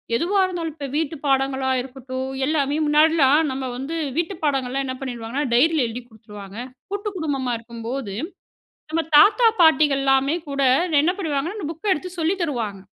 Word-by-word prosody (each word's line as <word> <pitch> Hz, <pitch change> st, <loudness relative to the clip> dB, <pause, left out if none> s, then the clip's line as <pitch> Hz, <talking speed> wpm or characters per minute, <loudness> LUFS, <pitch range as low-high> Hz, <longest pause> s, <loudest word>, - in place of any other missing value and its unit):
எதுவா 360 Hz, +11 st, +1 dB
இருந்தாலும், 340 Hz, -4 st, -4 dB
இப்போ 290 Hz, -2 st, -6 dB
வீட்டு 320 Hz, 0 st, -1 dB
பாடங்களா 270 Hz, -1 st, +1 dB
இருக்கட்டும். 260 Hz, 0 st, -6 dB, 0.2 s
எல்லாமே 285 Hz, -1 st, 0 dB
முன்னாடிலாம் 300 Hz, -1 st, +4 dB
நம்ம 260 Hz, 0 st, -4 dB
வந்து 275 Hz, +6 st, -5 dB, 0.2 s
வீட்டு 345 Hz, +3 st, -1 dB
பாடங்கள்லா 270 Hz, -2 st, 0 dB
என்ன 260 Hz, -, -3 dB
பண்ணிடுவாங்கன்னா, 245 Hz, +1 st, -4 dB
டைரியில 295 Hz, +2 st, +3 dB
எழுதிக் 240 Hz, +2 st, -7 dB
குடுத்துருவாங்க. 210 Hz, -2 st, -12 dB, 0.3 s
கூட்டு 405 Hz, +1 st, -3 dB
குடும்பமா 280 Hz, -7 st, -2 dB
இருக்கும்போது, 230 Hz, 0 st, -6 dB, 0.8 s
நம்ம 325 Hz, +1 st, 0 dB
தாத்தா 425 Hz, +9 st, +6 dB
பாட்டிகள்லாமே 275 Hz, -3 st, +4 dB
கூட 280 Hz, 0 st, -3 dB, 0.4 s
என்ன 345 Hz, +4 st, +2 dB
பண்ணுவாங்கன்னா, 320 Hz, +2 st, -2 dB
அந்த 365 Hz, -, -4 dB
புக்க 380 Hz, +5 st, -1 dB
எடுத்து 365 Hz, +2 st, -3 dB
சொல்லி 335 Hz, +4 st, +1 dB
தருவாங்க. 230 Hz, -, -3 dB
275 Hz, 145 wpm, -22 LUFS, 260-320 Hz, 0.8 s, தாத்தா